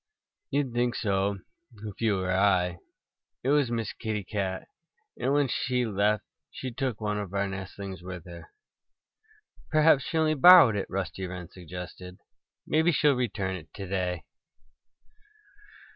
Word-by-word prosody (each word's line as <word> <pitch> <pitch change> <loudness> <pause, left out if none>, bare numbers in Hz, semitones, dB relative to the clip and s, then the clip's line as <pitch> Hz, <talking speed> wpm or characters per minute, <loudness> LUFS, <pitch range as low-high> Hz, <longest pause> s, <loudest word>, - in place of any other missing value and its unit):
"You'd 140 -3 -1
think 120 0 +1
so 100 -2 0 0.4
if 105 0 -9
you 110 -3 +2
were 95 0 -1
I. 90 -3 +2 0.6
It 130 - 0
was 145 -3 +3
Miss 115 -3 -2
Kitty 110 -3 -3
Cat. 95 -1 -3 0.5
And 135 - 0
when 145 -1 +3
she 125 0 0
left 105 -1 +1 0.3
she 130 - -6
took 130 -3 -3
one 105 -1 -1
of 100 -1 -6
our 100 0 +1
nestlings 95 0 -7
with 90 -2 -8
her." 85 -1 -11 1.2
"Perhaps 155 -3 +4
she 165 - -2
only 155 -1 +3
borrowed 155 - +8
it," 100 - -3
Rusty 95 0 -3
Wren 90 -2 -7
suggested. 90 +1 -9 0.5
"Maybe 160 +3 +3
she'll 150 -2 +4
return 105 -7 -2
it 80 -4 -10
to 100 - -6
day." 90 -3 -2
100 Hz, 145 wpm, -28 LUFS, 95-125 Hz, 1.2 s, borrowed